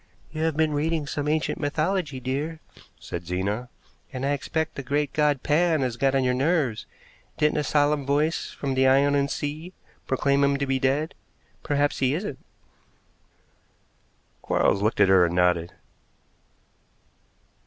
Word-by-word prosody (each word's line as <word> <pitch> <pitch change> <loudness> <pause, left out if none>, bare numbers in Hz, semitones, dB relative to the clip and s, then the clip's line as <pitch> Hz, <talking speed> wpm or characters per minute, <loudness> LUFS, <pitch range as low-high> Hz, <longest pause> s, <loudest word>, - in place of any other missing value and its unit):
"You 155 0 -5
have 160 -2 -1
been 160 -1 +2
reading 155 +1 0
some 145 +1 -3
ancient 155 +1 0
mythology, 155 0 -1
dear," 140 +6 -3 0.4
said 85 -1 -7
Zena, 100 +7 -2 0.4
"and 130 0 -4
I 140 - +1
expect 160 +3 -2
the - - -5
great 145 +1 -1
god 150 -3 +1
Pan 160 0 +2
has 125 -3 -1
got 135 +2 +1
on 135 - +2
your 125 0 +2
nerves. 135 -3 0 0.5
Didn't 150 0 +2
a - - 0
solemn 145 0 +2
voice 150 +4 0
from 140 -2 -4
the 130 0 +3
Ionian 140 +1 +3
Sea 155 +6 -5 0.3
proclaim 140 +1 +2
him 140 0 +2
to 140 - -1
be 135 -1 0
dead? 140 +4 0 0.5
Perhaps 145 0 0
he 130 +2 +2
isn't." 165 -7 -5 2.0
Quarles 100 - +1
looked 110 +1 0
at 100 - +6
her 95 -2 +6
and 85 0 0
nodded. 90 -1 +2
140 Hz, 150 wpm, -25 LUFS, 130-150 Hz, 2.0 s, at